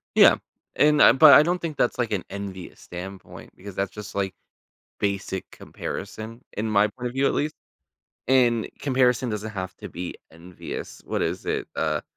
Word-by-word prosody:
Yeah, -, -, +8 dB, 0.4 s
and, 150 Hz, 0 st, +4 dB
um, -, -, +7 dB
but 155 Hz, -2 st, +10 dB
I 150 Hz, -, +9 dB
don't 175 Hz, +2 st, 0 dB
think 160 Hz, -3 st, -5 dB
that's, 125 Hz, -, +1 dB
like, 120 Hz, -3 st, -1 dB
an 100 Hz, -4 st, -1 dB
envious 95 Hz, -3 st, -7 dB
standpoint 95 Hz, +2 st, -9 dB
because 100 Hz, 0 st, -10 dB
that's 100 Hz, 0 st, -1 dB
just, 105 Hz, -1 st, -9 dB
like, 95 Hz, -1 st, -1 dB, 0.7 s
basic 100 Hz, -2 st, -2 dB
comparison 110 Hz, +4 st, -7 dB, 0.2 s
in 110 Hz, +2 st, -1 dB
my 105 Hz, 0 st, +4 dB
point 125 Hz, +4 st, -5 dB
of -, -, -8 dB
view 135 Hz, +1 st, +2 dB
at -, -, +1 dB
least. 150 Hz, +1 st, -1 dB, 0.7 s
And 120 Hz, -3 st, +3 dB
comparison 130 Hz, -3 st, +2 dB
doesn't 105 Hz, +1 st, -4 dB
have 95 Hz, -2 st, -5 dB
to -, -, -8 dB
be 90 Hz, 0 st, -6 dB, 0.2 s
envious. 85 Hz, +2 st, -8 dB
What -, -, -1 dB
is -, -, -2 dB
it? -, -, -1 dB
Uh, -, -, 0 dB
105 Hz, 180 wpm, -25 LUFS, 95-130 Hz, 0.7 s, but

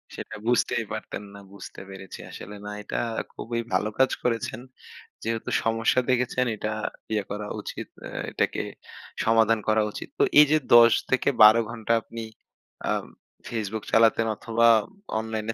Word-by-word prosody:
সেটা -, -, -7 dB
বুঝতেই 120 Hz, 0 st, +1 dB
পারতেন 105 Hz, -, -5 dB
না। 100 Hz, -, -10 dB
বুঝতে 100 Hz, -, -10 dB
পেরেছি 95 Hz, -1 st, -9 dB
আসলে, 105 Hz, -, -9 dB
না -, -, -5 dB
এটা -, -, -4 dB, 0.4 s
খুবই 115 Hz, 0 st, -4 dB
ভালো 105 Hz, +3 st, +1 dB
কাজ 130 Hz, -, +4 dB
করেছেন। 115 Hz, -1 st, -1 dB, 0.6 s
যেহেতু 115 Hz, 0 st, -2 dB
সমস্যা 115 Hz, +2 st, +2 dB
দেখেছেন 125 Hz, 0 st, +1 dB
এটা 110 Hz, +1 st, -3 dB, 0.4 s
ইয়ে 105 Hz, -2 st, 0 dB
করা 105 Hz, 0 st, -4 dB
উচিত। -, -, -7 dB, 0.2 s
অ্যা -, -, -6 dB
এটাকে -, -, 0 dB, 0.6 s
সমাধান 115 Hz, 0 st, +4 dB
করা 110 Hz, 0 st, +3 dB
উচিত। -, -, -7 dB
তো -, -, +5 dB, 0.2 s
এই 150 Hz, -, +10 dB
যে 155 Hz, -, +6 dB, 0.2 s
১০ 115 Hz, 0 st, +9 dB, 0.2 s
থেকে 130 Hz, +1 st, +2 dB
১২ 110 Hz, +2 st, +9 dB
ঘন্টা 115 Hz, -1 st, -1 dB
আপনি 115 Hz, +1 st, -8 dB, 0.7 s
আও -, -, 0 dB, 0.5 s
Facebook 110 Hz, -2 st, -3 dB
চালাতেন 115 Hz, 0 st, +4 dB
অথবা 115 Hz, 0 st, +2 dB, 0.5 s
অনলাইনে 110 Hz, 0 st, -3 dB
115 Hz, 145 wpm, -26 LUFS, 110-115 Hz, 0.7 s, এই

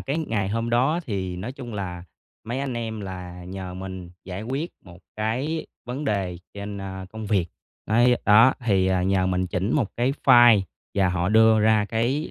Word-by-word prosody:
cái 140 Hz, +4 st, -2 dB
ngày 110 Hz, -11 st, -1 dB
hôm 115 Hz, +3 st, -2 dB
đó 135 Hz, +8 st, +2 dB
thì 95 Hz, -5 st, -3 dB
nói 105 Hz, +8 st, -5 dB
chung 125 Hz, -4 st, -8 dB
là 90 Hz, -3 st, -5 dB, 0.4 s
mấy 120 Hz, +4 st, -3 dB
anh 135 Hz, -2 st, -3 dB
em 110 Hz, -2 st, -4 dB
là 90 Hz, -2 st, -7 dB
nhờ 95 Hz, 0 st, -7 dB
mình 95 Hz, -1 st, -7 dB
giải 95 Hz, +2 st, -6 dB
quyết 135 Hz, +9 st, -3 dB
một 90 Hz, -2 st, -13 dB, 0.2 s
cái 130 Hz, +9 st, -2 dB, 0.2 s
vấn 125 Hz, +5 st, -5 dB
đề 95 Hz, -7 st, -1 dB, 0.2 s
trên, 100 Hz, 0 st, -6 dB
a, 95 Hz, -1 st, -6 dB
công 110 Hz, -1 st, -7 dB
việc. 100 Hz, -5 st, +1 dB, 0.4 s
Đấy, 120 Hz, +3 st, +4 dB
đó 115 Hz, +5 st, +6 dB
thì, 95 Hz, -4 st, +3 dB
ờ, 95 Hz, -1 st, +1 dB
nhờ 95 Hz, 0 st, +2 dB
mình 90 Hz, 0 st, 0 dB
chỉnh 95 Hz, +5 st, -1 dB
một 125 Hz, -9 st, +1 dB
cái 125 Hz, +3 st, +1 dB
file 120 Hz, -3 st, +7 dB, 0.3 s
và 95 Hz, -2 st, +3 dB
họ 90 Hz, 0 st, 0 dB
đưa 110 Hz, +1 st, +5 dB
ra 110 Hz, -1 st, +4 dB
cái 120 Hz, +8 st, -1 dB
105 Hz, 190 wpm, -24 LUFS, 95-120 Hz, 0.4 s, file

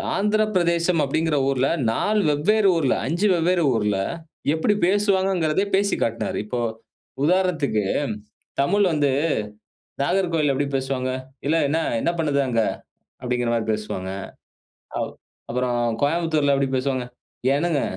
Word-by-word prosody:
ஆந்திரப்பிரதேசம் 185 Hz, -6 st, +2 dB
அப்டிங்கற 155 Hz, +2 st, 0 dB
ஊர்ல 135 Hz, 0 st, +1 dB, 0.2 s
4 210 Hz, -, +1 dB
வெவ்வேறு 195 Hz, +8 st, +3 dB
ஊர்ல, 140 Hz, -5 st, +2 dB
5 175 Hz, +7 st, +1 dB
வெவ்வேறு 175 Hz, 0 st, +2 dB
ஊர்ல 105 Hz, -2 st, +1 dB, 0.6 s
எப்டி 185 Hz, +6 st, +1 dB
பேசுவாங்கங்கறதையு 190 Hz, -3 st, +2 dB
பேசிக் 200 Hz, +1 st, +1 dB
காட்னாரு. 115 Hz, 0 st, -1 dB
இப்போ 120 Hz, +3 st, -3 dB, 0.7 s
உதாரணத்துக்கு 165 Hz, -, +1 dB, 0.8 s
தமிழ் 200 Hz, +7 st, +3 dB
வந்து 145 Hz, -3 st, +2 dB, 0.9 s
நாகர்கோவில்ல 165 Hz, -4 st, +1 dB
எப்டி 145 Hz, +1 st, 0 dB
பேசுவாங்க? 130 Hz, -1 st, -1 dB, 0.4 s
"எல 165 Hz, +2 st, +3 dB
என்ன 160 Hz, +2 st, +1 dB, 0.2 s
என்ன 170 Hz, -, +1 dB
பண்ணுத 145 Hz, -3 st, +1 dB
அங்க" 115 Hz, -2 st, +1 dB, 0.6 s
அப்டிங்கற 120 Hz, -1 st, -1 dB
மாரி 115 Hz, -1 st, 0 dB
பேசுவாங்க. 100 Hz, -3 st, -4 dB, 0.9 s
அப் -, -, -3 dB, 0.4 s
அப்பறம் 120 Hz, -2 st, 0 dB
கோயம்புத்தூர்ல 155 Hz, -2 st, +2 dB
எப்டி 135 Hz, -1 st, 0 dB
பேசுவாங்க? 130 Hz, -1 st, -1 dB, 0.5 s
"ஏனுங்க 155 Hz, -1 st, +1 dB
155 Hz, 115 wpm, -23 LUFS, 130-180 Hz, 0.9 s, வெவ்வேறு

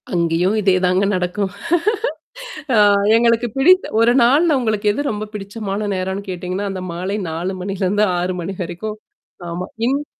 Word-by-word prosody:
அங்கேயும் 170 Hz, +3 st, +1 dB
இதேதாங்க 185 Hz, 0 st, +2 dB
நடக்கும். 185 Hz, +2 st, -2 dB, 1.2 s
ஆ -, -, +4 dB, 0.4 s
எங்களுக்குப் 230 Hz, -1 st, +2 dB
பிடித் 365 Hz, +8 st, +5 dB
ஒரு 230 Hz, +1 st, +5 dB
நாள்ள 285 Hz, +8 st, +4 dB
உங்களுக்கு 215 Hz, -4 st, -1 dB
எது 225 Hz, -, -3 dB
ரொம்பப் 210 Hz, 0 st, -5 dB
பிடித்தமான 205 Hz, 0 st, -4 dB
நேரம் 190 Hz, +1 st, -2 dB
கேட்டிங்கன்னா, 185 Hz, +2 st, -3 dB
அந்த 190 Hz, -1 st, -5 dB
மாலை 185 Hz, +4 st, -3 dB
4 170 Hz, +4 st, -3 dB
மணியிலிருந்து 195 Hz, +2 st, 0 dB
6 180 Hz, +1 st, -1 dB
மணி 175 Hz, +3 st, -4 dB
வரைக்கும். 210 Hz, +5 st, -5 dB, 0.5 s
ஆமா. 175 Hz, +2 st, -4 dB, 0.2 s
இன்னகு 280 Hz, +4 st, 0 dB
195 Hz, 135 wpm, -19 LUFS, 180-220 Hz, 1.2 s, பிடித்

